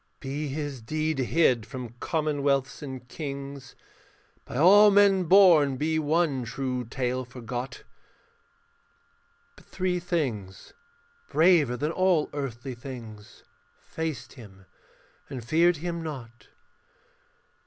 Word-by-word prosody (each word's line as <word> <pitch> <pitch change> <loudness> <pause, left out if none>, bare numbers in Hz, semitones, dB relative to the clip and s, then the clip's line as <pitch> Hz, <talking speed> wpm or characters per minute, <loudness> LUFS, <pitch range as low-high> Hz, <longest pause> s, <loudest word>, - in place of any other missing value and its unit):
Be 145 +2 -4
his 145 -2 -5
deed 155 +4 -2
hid 130 -3 +2
from 125 -3 -7
commonwealths 145 -4 -1
and 130 -3 -8
kings, 140 -1 -7 0.7
By - - -6
all 200 +7 +7
men 200 -2 +4
born 165 -7 +6
be 160 +3 0
one 155 -3 +1
true 125 +1 -3
tale 130 +1 -2
forgot; 125 +1 -7 1.7
But - - -19
three 180 -1 -2
things, 130 - -4 0.6
braver 160 -7 +4
than 150 +5 -1
all 180 -3 +1
earthly 135 -2 -5
things, 120 -3 -10 0.3
Faced 160 -3 -6
him 95 -6 -14 0.6
and 125 -4 -7
feared 170 +6 +3
him 170 +2 -4
not. 125 -7 -8
140 Hz, 105 wpm, -27 LUFS, 125-160 Hz, 1.7 s, all